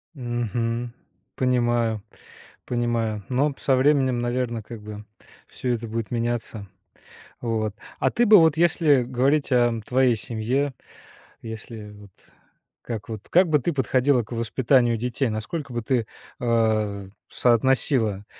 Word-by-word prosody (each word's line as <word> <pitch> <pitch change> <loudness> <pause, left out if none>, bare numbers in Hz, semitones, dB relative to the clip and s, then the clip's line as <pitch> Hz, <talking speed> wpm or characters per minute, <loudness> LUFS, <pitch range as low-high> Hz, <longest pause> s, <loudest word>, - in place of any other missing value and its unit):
Мгм. 120 -1 -2 0.4
Понимаю, 120 -4 +1 0.6
понимаю, 115 -4 -1
но 140 +3 +1
со 135 - +2
временем, 130 -2 +3
наверно, 120 -1 -2
как 110 0 -10
бы 105 0 -9 0.4
всё 125 -1 -3
это 115 0 -4
будет 115 -1 -4
меняться. 115 -3 -3 0.7
Вот. 110 -3 -1 0.3
А - - +2
ты 240 - +2
бы, 215 -2 +8
вот 160 -2 +4
если 160 -5 +3
говорить 135 +4 +1
о 120 -2 +3
твоей 125 -2 +3
семье, 125 +6 -2 0.7
если 110 -1 -8
вот 105 -2 -15 0.7
как 115 -3 -6
вот, 110 -3 -7
как 180 0 +4
бы 150 -1 +4
ты 165 +6 -1
подходила 130 -1 +2
к 110 - -15
воспитанию 120 +1 +2
детей, 125 +3 -1
насколько 125 +6 -4
бы 120 -1 -3
ты, 120 -2 0 0.3
а, 110 -4 +1 0.2
соотносила, 120 -4 +2
120 Hz, 125 wpm, -24 LUFS, 110-130 Hz, 0.7 s, бы